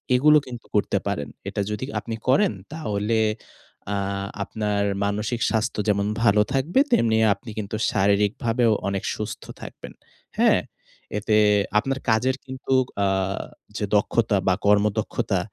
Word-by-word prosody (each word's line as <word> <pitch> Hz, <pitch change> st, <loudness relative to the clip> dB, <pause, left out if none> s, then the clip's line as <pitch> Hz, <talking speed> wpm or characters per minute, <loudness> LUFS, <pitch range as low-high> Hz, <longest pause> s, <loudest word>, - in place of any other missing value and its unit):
এগুলো 150 Hz, +4 st, +6 dB
কিন্তু 120 Hz, -2 st, -8 dB
করতে 100 Hz, -1 st, +2 dB
পারেন। 85 Hz, -8 st, -2 dB, 0.2 s
এটা 100 Hz, -, -2 dB
যদি 105 Hz, +5 st, -3 dB
আপনি 115 Hz, +1 st, -5 dB
করেন, 130 Hz, -3 st, +4 dB, 0.2 s
তাহলে 110 Hz, -6 st, -1 dB, 0.8 s
আ -, -, 0 dB, 0.5 s
আপনার 105 Hz, -1 st, -1 dB, 0.2 s
মানসিক 105 Hz, +4 st, -1 dB
স্বাস্থ্য 110 Hz, -1 st, -1 dB
যেমন 100 Hz, 0 st, +1 dB, 0.2 s
ভালো 105 Hz, -1 st, +5 dB
থাকবে, 145 Hz, -, +1 dB
তেমনি 115 Hz, -, +3 dB, 0.2 s
আপনি 100 Hz, +4 st, -12 dB
কিন্তু 105 Hz, +1 st, -4 dB, 0.2 s
শারীরিকভাবেও 110 Hz, +4 st, +2 dB, 0.2 s
অনেক 100 Hz, -1 st, -2 dB
সুস্থ 105 Hz, 0 st, -5 dB, 0.2 s
থাকবেন। -, -, -9 dB, 0.4 s
হ্যাঁ? -, -, +5 dB, 0.6 s
এতে 105 Hz, +1 st, +2 dB, 0.4 s
আপনার 135 Hz, +4 st, -2 dB
কাজের 125 Hz, +4 st, +2 dB
কিন্তু 130 Hz, 0 st, -4 dB, 0.3 s
আ -, -, +3 dB, 0.7 s
যে 105 Hz, -, -1 dB
দক্ষতা 105 Hz, 0 st, +2 dB
বা, 95 Hz, -, +5 dB
কর্মদক্ষতা, 105 Hz, 0 st, +1 dB
110 Hz, 130 wpm, -24 LUFS, 100-125 Hz, 0.8 s, এগুলো